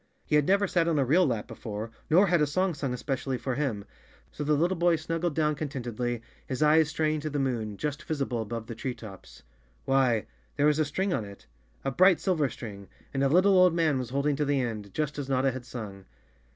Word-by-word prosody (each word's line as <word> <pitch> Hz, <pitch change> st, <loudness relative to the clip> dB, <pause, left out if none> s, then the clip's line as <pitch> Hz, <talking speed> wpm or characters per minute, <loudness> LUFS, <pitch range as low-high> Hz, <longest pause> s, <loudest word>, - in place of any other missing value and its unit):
He -, -, +1 dB
had 150 Hz, -1 st, +3 dB
never 200 Hz, +1 st, +4 dB
sat 170 Hz, -2 st, +1 dB
on 165 Hz, -2 st, +2 dB
a 140 Hz, -, +2 dB
real 170 Hz, +7 st, +4 dB
lap 115 Hz, -5 st, -2 dB
before, 110 Hz, 0 st, -6 dB, 0.2 s
nor 180 Hz, +6 st, +6 dB
had 175 Hz, -4 st, +2 dB
a 150 Hz, -, +3 dB
song 185 Hz, +5 st, 0 dB
sung 140 Hz, -3 st, -3 dB
es¬ 125 Hz, -, -5 dB
pecially 135 Hz, -2 st, -2 dB
for 130 Hz, -, -2 dB
him. 120 Hz, -7 st, -2 dB, 0.5 s
So 150 Hz, -, -5 dB
the 150 Hz, +1 st, +2 dB
little 175 Hz, +5 st, +1 dB
boy 175 Hz, 0 st, +3 dB
snuggled 165 Hz, 0 st, -2 dB
down 150 Hz, -1 st, +1 dB
con¬ 150 Hz, 0 st, -4 dB
tentedly, 120 Hz, -3 st, -3 dB, 0.3 s
his 130 Hz, +3 st, -1 dB
eyes 155 Hz, 0 st, +5 dB
straying 155 Hz, +1 st, 0 dB
to 155 Hz, +1 st, -4 dB
the 145 Hz, -, -3 dB
moon, 115 Hz, -7 st, -2 dB
just 150 Hz, +3 st, -3 dB
visible 140 Hz, -7 st, -2 dB
above 110 Hz, +1 st, -5 dB
the 115 Hz, -, -6 dB
tree 120 Hz, +3 st, -4 dB
tops. 100 Hz, -4 st, -12 dB, 0.4 s
Why, 130 Hz, -5 st, +2 dB, 0.3 s
there 145 Hz, -, +2 dB
was 150 Hz, 0 st, +3 dB
a 155 Hz, -, +3 dB
string 185 Hz, +6 st, -1 dB
on 110 Hz, -, -1 dB
it, 100 Hz, -1 st, -12 dB, 0.4 s
a 135 Hz, -, 0 dB
bright 185 Hz, +5 st, +5 dB
silver 160 Hz, -8 st, +1 dB
string, 100 Hz, -8 st, -9 dB, 0.3 s
and 135 Hz, 0 st, 0 dB
a 135 Hz, -, +3 dB
little, 185 Hz, +6 st, +5 dB
old 180 Hz, -2 st, +5 dB
man 155 Hz, -5 st, +2 dB
was 125 Hz, -3 st, -4 dB
holding 140 Hz, +2 st, 0 dB
to 150 Hz, -, +1 dB
the 140 Hz, -1 st, +1 dB
end, 110 Hz, -5 st, -3 dB
just 150 Hz, -1 st, -2 dB
as 135 Hz, -1 st, -5 dB
Notta 135 Hz, 0 st, +2 dB
had 125 Hz, -1 st, -8 dB
sung! 100 Hz, -6 st, -7 dB
140 Hz, 230 wpm, -28 LUFS, 120-155 Hz, 0.5 s, nor